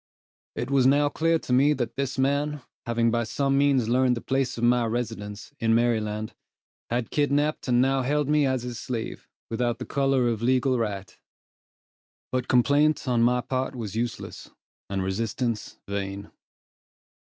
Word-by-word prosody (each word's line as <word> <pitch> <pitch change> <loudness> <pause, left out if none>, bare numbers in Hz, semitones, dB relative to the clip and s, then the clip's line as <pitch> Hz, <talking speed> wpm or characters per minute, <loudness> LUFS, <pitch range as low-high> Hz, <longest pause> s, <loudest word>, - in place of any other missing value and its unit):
It 125 +3 -3
was 135 -2 +4
now 145 +2 +4
clear 165 +2 +2
to 130 - -3
me 140 +4 +5
that 120 -4 -3
this 135 -1 -2
man, 140 +1 0 0.2
having 115 0 +2
by 120 0 +1
some 135 +5 0
means 140 -4 +3
learned 125 +1 +3
the - - -5
place 135 -1 -1
of 115 - -4
my 120 0 +4
residence, 110 -1 -4
in 115 0 +3
Maryland, 110 -2 0 0.6
had 120 -1 -2
kidnapped 145 0 +1
and 125 0 +4
now 135 0 +2
held 145 +2 0
me 150 -1 +3
as 130 -2 -1
his 120 -2 -5
slave, 120 -2 -5 0.2
without 120 +1 0
the 125 - -6
color 135 -3 +1
of 115 -2 -1
legal 130 +1 +2
right; 100 -4 -3 1.2
but 130 -1 -1
complaint 145 +3 +3
on 120 -2 +2
my 125 +1 +3
part 130 +1 -2
was 110 -5 -5
useless, 120 +1 -4 0.4
and 95 -1 -1
resistance 110 +3 -2
vain. 100 0 -4
125 Hz, 160 wpm, -26 LUFS, 115-135 Hz, 1.2 s, me